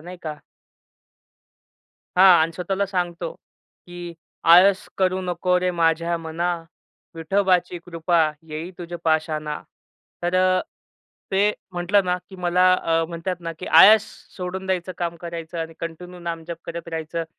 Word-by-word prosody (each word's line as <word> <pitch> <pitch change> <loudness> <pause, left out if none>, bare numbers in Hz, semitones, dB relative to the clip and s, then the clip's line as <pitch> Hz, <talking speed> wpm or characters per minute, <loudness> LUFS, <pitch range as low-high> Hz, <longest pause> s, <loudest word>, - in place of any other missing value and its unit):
नाही 180 +3 -9
का? 155 -2 -5 1.8
हां, 185 -2 +8
आणि 165 +1 -1
स्वतःला 190 +3 -2
सांगतो, 175 -3 -3 0.5
की 175 -1 -8 0.4
"आळस 190 +3 +6
करू 185 0 +1
नको 180 0 +1
रे 180 0 +1
माझ्या 170 0 +1
मना, 165 +2 -3 0.7
विठोबाची 180 +1 +1
कृपा, 170 0 +1 0.3
येई 155 +3 -5
तुझ्या 175 0 -6
पाशाणा." 155 -2 0 0.6
तर 175 +1 -1
अ, 185 0 +3 0.7
ते 200 +2 +3 0.2
म्हटलं 180 +3 +2
ना, 180 0 +1
की 190 - -11
मला 180 0 +2
अ, 165 -2 +1
म्हणतात 175 +1 -4
ना, 165 -1 -5
की 180 - -7
आळस 215 +1 +8 0.3
सोडून 185 +1 -5
द्यायचं, 185 -1 -1
काम 170 -1 -2
करायचं 170 0 -6
आणि 165 0 -4
कंटिन्यू 175 +2 -7
नामजप 170 -1 -5
करत 170 0 -7
राहायचं. 165 +1 -3
175 Hz, 135 wpm, -23 LUFS, 165-185 Hz, 1.8 s, हां